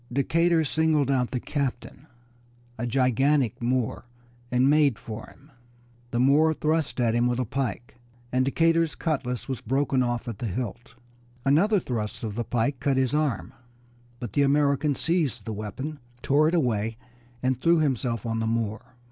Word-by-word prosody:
Decatur 165 +5 +2
singled 155 -2 +2
out 125 -2 +1
the 125 - -2
captain, 135 +1 -4 0.7
a 120 +1 -3
gigantic 130 0 +2
Moor, 120 -1 -1 0.5
and 125 +1 +3
made 145 -5 +4
for 110 +2 -8
him. 145 +3 -19 0.6
The 120 - -1
Moor 150 +5 +4
thrust 155 -5 0
at 115 -2 +2
him 120 +1 +2
with 120 -1 0
a 130 - 0
pike, 125 -1 -4 0.3
and 130 +1 +2
Decatur's 165 +3 +2
cutlass 130 -7 -2
was 130 -3 -4
broken 135 +2 +1
off 120 -1 -1
at 115 -4 -5
the 120 - -3
hilt. 120 +3 -5 0.5
Another 185 +10 +4
thrust 115 -9 -4
of 110 -2 -3
the 120 +3 -2
pike 120 +3 -1
cut 140 -2 +1
his 130 0 +1
arm, 150 -8 -1 0.7
but 120 -5 -6
the 145 - +2
American 140 0 +2
seized 145 - -1
the 110 - -4
weapon, 120 +9 -5 0.2
tore 145 +3 +4
it 170 - +1
away, 115 -7 0 0.5
and 130 -1 0
threw 170 0 +4
himself 125 -7 0
on 115 -1 -1
the 110 - -1
Moor. 115 -1 -1
130 Hz, 165 wpm, -26 LUFS, 120-150 Hz, 0.7 s, made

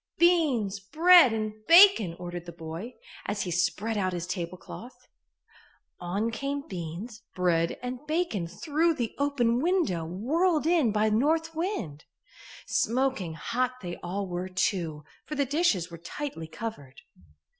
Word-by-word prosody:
"Beans, 280 - +3
bread 320 - +6
and 215 -1 -2
bacon," 335 - +7
ordered 175 -1 -7
the - - -6
boy, 165 +8 -8 0.3
as 205 0 -1
he 180 - -4
spread 180 +5 0
out 185 -2 0
his 175 -1 -3
tablecloth. 185 +6 -7 0.9
On 200 +6 -2
came 280 +4 -4
beans, 185 +6 -7
bread 170 -2 +1
and 250 0 -4
bacon 305 - -1
through 315 - 0
the 235 -5 -3
open 250 -4 +1
window, 330 - +1
whirled 295 - 0
in 325 -9 +3
by 215 +1 +2
North 320 +8 +1
Wind. 315 - -4 0.6
Smoking 235 -9 0
hot 245 +10 -1
they 175 -1 -5
all 195 +3 -4
were, 180 0 -4
too, 175 -5 -1 0.2
for 305 - -6
the 280 - +1
dishes 255 - +1
were 170 - -9
tightly 175 - -6
covered. 160 -9 -7
215 Hz, 135 wpm, -28 LUFS, 175-285 Hz, 0.9 s, bacon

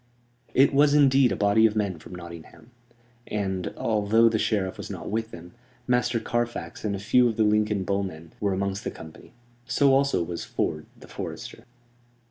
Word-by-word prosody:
It 135 +1 +5
was 145 +1 +4
indeed 135 -3 +5
a - - 0
body 105 +2 +4
of 110 - -4
men 100 -6 -1
from 90 - -11
Nottingham; 85 +6 -11 0.6
and, 95 -3 -2
although 110 +1 +3
the 110 -1 -1
Sheriff 95 -4 0
was - - -7
not - - -6
with 110 +1 -2
them, 85 -3 -11 0.3
Master 125 -1 +1
Carfax 120 +1 -3
and 105 -2 -1
a - - -5
few 120 +5 +3
of 110 - -5
the 110 - +3
Lincoln 105 -1 +1
bowmen 95 -5 -4
were 100 -1 0
amongst 100 +1 -2
the - - -2
company. 80 -1 -12 0.4
So 135 +3 +3
also 140 -8 +2
was 85 0 -5
Ford, 75 0 -3
the - - -14
forester. - - -8
105 Hz, 175 wpm, -25 LUFS, 95-120 Hz, 0.6 s, It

